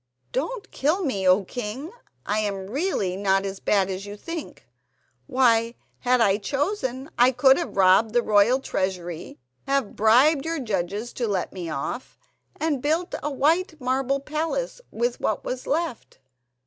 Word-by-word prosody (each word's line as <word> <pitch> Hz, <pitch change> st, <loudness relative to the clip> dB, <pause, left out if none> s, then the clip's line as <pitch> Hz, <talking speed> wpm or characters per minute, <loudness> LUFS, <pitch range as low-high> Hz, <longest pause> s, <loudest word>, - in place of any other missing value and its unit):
"Don't 405 Hz, -, -3 dB
kill 325 Hz, +7 st, 0 dB
me, 195 Hz, -9 st, -1 dB
O 185 Hz, +2 st, +5 dB
king! 245 Hz, -, -5 dB, 0.3 s
I 210 Hz, +1 st, 0 dB
am 200 Hz, -2 st, -3 dB
really 270 Hz, -, -1 dB
not 195 Hz, 0 st, +1 dB
as 195 Hz, 0 st, -5 dB
bad 195 Hz, -2 st, +2 dB
as 190 Hz, +1 st, -4 dB
you 205 Hz, +1 st, -7 dB
think. 330 Hz, +7 st, -7 dB, 0.6 s
Why, 235 Hz, -3 st, +3 dB, 0.2 s
had 250 Hz, 0 st, +2 dB
I 205 Hz, -4 st, +4 dB
chosen, 275 Hz, -, -2 dB
I 245 Hz, +2 st, +6 dB
could 265 Hz, +1 st, +5 dB
have 335 Hz, -, -5 dB
robbed 195 Hz, +4 st, +5 dB
the 240 Hz, -1 st, +3 dB
royal 215 Hz, +5 st, +4 dB
treasury, 180 Hz, -6 st, -3 dB, 0.3 s
have 275 Hz, -5 st, 0 dB
bribed 260 Hz, +7 st, +5 dB
your 325 Hz, 0 st, -2 dB
judges 205 Hz, -1 st, -3 dB
to 240 Hz, -, -2 dB
let 195 Hz, -4 st, -2 dB
me 175 Hz, -3 st, -5 dB
off, 160 Hz, -, -5 dB, 0.4 s
and 305 Hz, -5 st, 0 dB
built 320 Hz, +5 st, 0 dB
a 295 Hz, -, -2 dB
white 315 Hz, +4 st, +1 dB
marble 265 Hz, +1 st, 0 dB
palace 325 Hz, -, -3 dB
with 240 Hz, +2 st, -1 dB
what 215 Hz, -, -1 dB
was 255 Hz, 0 st, -4 dB
left. 310 Hz, -4 st, -2 dB
245 Hz, 155 wpm, -25 LUFS, 200-290 Hz, 0.6 s, I